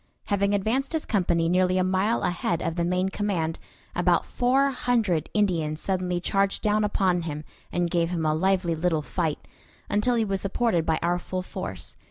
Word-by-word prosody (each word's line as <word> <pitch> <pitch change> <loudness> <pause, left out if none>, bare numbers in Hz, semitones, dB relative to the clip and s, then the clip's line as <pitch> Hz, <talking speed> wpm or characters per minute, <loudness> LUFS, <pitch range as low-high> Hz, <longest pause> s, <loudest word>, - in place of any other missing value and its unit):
Having 200 0 +2
advanced 235 +10 0
his 320 - -1
company 175 -5 +1
nearly 185 +1 +2
a 185 - +3
mile 190 +5 +1
ahead 170 -1 0
of 165 -1 -2
the 170 - 0
main 180 +2 +1
command, 185 -6 -2 0.4
about - - +2
four 265 +3 +2
hundred 230 - 0
Indians 165 -7 +1
suddenly 180 -1 -1
charged 195 +2 0
down 215 0 +2
upon 190 -4 +1
him 150 -2 -5 0.3
and 175 0 0
gave 170 -1 +1
him 170 -3 -2
a 155 - +2
lively 185 +1 +1
little 160 -1 0
fight, 160 -1 -2 0.4
until 210 +4 +2
he 225 -2 +2
was 195 -2 -1
supported 195 -4 0
by 160 -1 +2
our 175 +1 +1
full 185 +1 -4
force. 95 - -5
185 Hz, 180 wpm, -26 LUFS, 170-205 Hz, 0.4 s, a